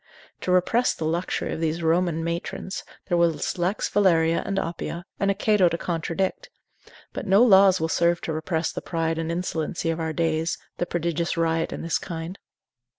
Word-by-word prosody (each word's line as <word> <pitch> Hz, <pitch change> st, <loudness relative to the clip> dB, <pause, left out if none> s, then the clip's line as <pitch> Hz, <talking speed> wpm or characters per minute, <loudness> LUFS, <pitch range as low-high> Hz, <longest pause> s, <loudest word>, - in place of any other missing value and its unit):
To 185 Hz, -, -2 dB
repress 205 Hz, +7 st, +3 dB
the 160 Hz, -, -4 dB
luxury 170 Hz, +3 st, -1 dB
of 160 Hz, -, -5 dB
those 165 Hz, +1 st, -1 dB
Roman 165 Hz, 0 st, +1 dB
matrons, 170 Hz, +3 st, -4 dB, 0.2 s
there 175 Hz, -, +1 dB
was 170 Hz, 0 st, +1 dB
Lex 185 Hz, +4 st, 0 dB
Valeria 165 Hz, -5 st, +3 dB
and 195 Hz, 0 st, -3 dB
Oppia, 170 Hz, -1 st, -3 dB, 0.2 s
and 200 Hz, -, +1 dB
a 200 Hz, -, +2 dB
Cato 205 Hz, -3 st, +3 dB
to 170 Hz, -, -2 dB
contradict; 170 Hz, +2 st, -2 dB, 0.6 s
but -, -, -5 dB
no 195 Hz, +4 st, +6 dB
laws 195 Hz, -4 st, +6 dB
will 160 Hz, -, 0 dB
serve 170 Hz, +1 st, +2 dB
to 160 Hz, -, -3 dB
repress 160 Hz, +1 st, -1 dB
the -, -, -5 dB
pride 165 Hz, -1 st, -1 dB
and 165 Hz, 0 st, -2 dB
insolency 170 Hz, -1 st, -2 dB
of 165 Hz, -, -3 dB
our 160 Hz, -1 st, -1 dB
days, 160 Hz, 0 st, 0 dB, 0.2 s
the 175 Hz, -, -1 dB
prodigious 170 Hz, 0 st, -1 dB
riot 165 Hz, 0 st, +1 dB
in -, -, -5 dB
this 165 Hz, -, 0 dB
kind. 170 Hz, +1 st, -6 dB
170 Hz, 180 wpm, -25 LUFS, 165-185 Hz, 0.6 s, no